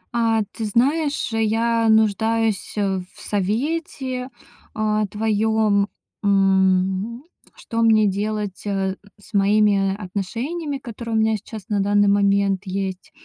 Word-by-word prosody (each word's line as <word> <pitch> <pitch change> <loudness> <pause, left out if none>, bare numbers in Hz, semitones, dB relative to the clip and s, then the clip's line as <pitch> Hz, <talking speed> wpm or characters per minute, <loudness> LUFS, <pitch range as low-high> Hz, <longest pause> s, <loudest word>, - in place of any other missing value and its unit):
А, 225 -1 +2
ты 225 - -5
знаешь, 285 +8 +1
я 225 +1 +1
нуждаюсь, 220 0 +2
э, 195 -2 0 0.2
в - - -15
совете, 255 - -2 0.5
а, 215 -1 0
твоём. 215 -1 +1 0.4
М, 195 +3 +2 0.3
что 230 0 -4
мне 220 -2 +5
делать, 205 0 -2
э, 195 -1 -1 0.2
с 205 - -17
моими 200 -1 +3
отношениями, 235 - -4
которые 235 -3 -6
у - - +3
меня 220 0 +2
сейчас 210 0 -10
на 205 -1 0
данный 205 0 +3
момент 200 -1 +2
есть. 190 -1 -4
215 Hz, 120 wpm, -22 LUFS, 200-225 Hz, 0.5 s, мне